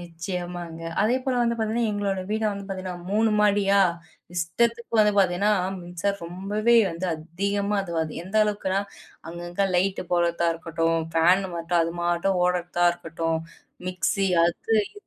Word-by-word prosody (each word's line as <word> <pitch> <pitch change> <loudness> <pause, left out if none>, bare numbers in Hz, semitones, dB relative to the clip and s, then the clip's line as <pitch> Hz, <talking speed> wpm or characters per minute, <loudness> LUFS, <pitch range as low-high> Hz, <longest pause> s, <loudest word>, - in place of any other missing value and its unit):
நிச்சியமாங்க. 175 -1 -6 0.2
அதேபோல 255 +3 +1
வந்து 235 0 +1
பார்த்தீங்கன்னா, 220 0 0
எங்களோட 200 -2 -1
வீடு 220 0 0
வந்து 200 0 -6
பார்த்தீங்கன்னா 185 -2 -5
3 220 +2 +3
மாடியா 200 -1 +3 0.6
இஷ்டத்துக்கு 230 +8 0
வந்து 210 -1 +4
பார்த்தீங்கன்னா, 195 +2 +3 0.3
மின்சாரம் 175 +2 -3
ரொம்பவே 205 +6 +1
வந்து 170 +3 -4
அதிகமா 200 +6 -2
அதுவாது 165 -4 -2
எந்த 195 +4 -4
அளவுக்குன்னா 200 -2 0 0.5
அங்கங்கே 175 +3 -2
லைட் 190 +2 +1
போடுறதா 170 -1 +2
இருக்கட்டும், 165 0 -1 0.2
ஃபேன் 180 +4 +4
மட்டும் 170 +1 +1
அது 165 0 -2
மாட்டும் 175 +2 +1
ஓடுறதா 175 -1 0
இருக்கட்டும், 165 -1 -3 0.5
மிக்ஸி 190 +2 0 0.2
அது 175 +6 -1 0.2
இது 410 - -14
185 Hz, 130 wpm, -25 LUFS, 170-205 Hz, 0.6 s, வந்து